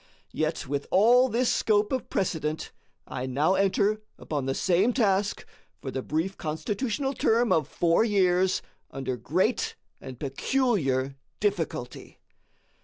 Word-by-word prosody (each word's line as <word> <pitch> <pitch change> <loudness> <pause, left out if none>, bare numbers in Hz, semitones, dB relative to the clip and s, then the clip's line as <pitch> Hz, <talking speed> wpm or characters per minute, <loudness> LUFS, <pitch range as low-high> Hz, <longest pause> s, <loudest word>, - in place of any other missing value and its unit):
Yet, 155 +1 -1
with 140 +1 -3
all 245 +6 +5
this 240 +2 +1
scope 210 -1 +2
of 260 -1 -2
precedent, 160 -4 -2 0.3
I 130 +1 -5
now 145 +8 +2
enter 200 +2 +2 0.2
upon 145 -4 -3
the 135 - 0
same 190 +6 +2
task 205 -4 +1 0.3
for 135 - -6
the 130 - -3
brief 160 +8 -2
Constitutional 220 - -2
term 235 -1 +2
of 155 -3 +2
four 170 +5 +2
years 190 -3 +2 0.3
under 135 -1 -3
great 180 - 0 0.3
and 130 -2 -9
peculiar 135 - 0 0.2
difficulty. 170 -11 -3
185 Hz, 125 wpm, -27 LUFS, 145-215 Hz, 0.3 s, all